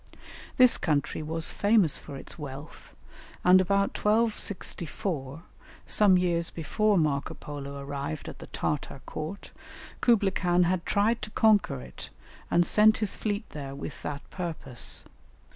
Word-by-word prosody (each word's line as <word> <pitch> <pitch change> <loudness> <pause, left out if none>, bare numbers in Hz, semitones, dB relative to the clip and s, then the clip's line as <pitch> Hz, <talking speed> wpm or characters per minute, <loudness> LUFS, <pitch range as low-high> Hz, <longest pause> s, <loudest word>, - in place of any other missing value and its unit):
This 255 -1 +7
country 150 -2 0
was 160 +1 -2
famous 205 -7 +3
for 145 - -9
its 135 - -7
wealth, 145 +1 -9 0.5
and 185 +1 +7
about 200 +2 +1
1264, 185 - -2 0.4
some 200 -3 +5
years 170 -2 +1
before 205 +6 +1
Marco 145 -4 0
Polo 140 -1 -7
arrived 140 +2 -5
at - - -8
the - - -10
Tartar 145 -2 -3
court, 175 +6 -6 0.5
Kublaï 210 -6 +3
Khan 180 -1 +2
had 175 0 0
tried 220 +3 +2
to - - -5
conquer 210 - +3
it 65 -1 -9 0.4
and 175 0 +3
sent 215 +3 +5
his 210 -3 0
fleet 210 0 -3
there 140 -2 -6
with 140 +1 -7
that 145 -1 -6
purpose. 160 -9 -5
175 Hz, 135 wpm, -28 LUFS, 145-205 Hz, 0.5 s, This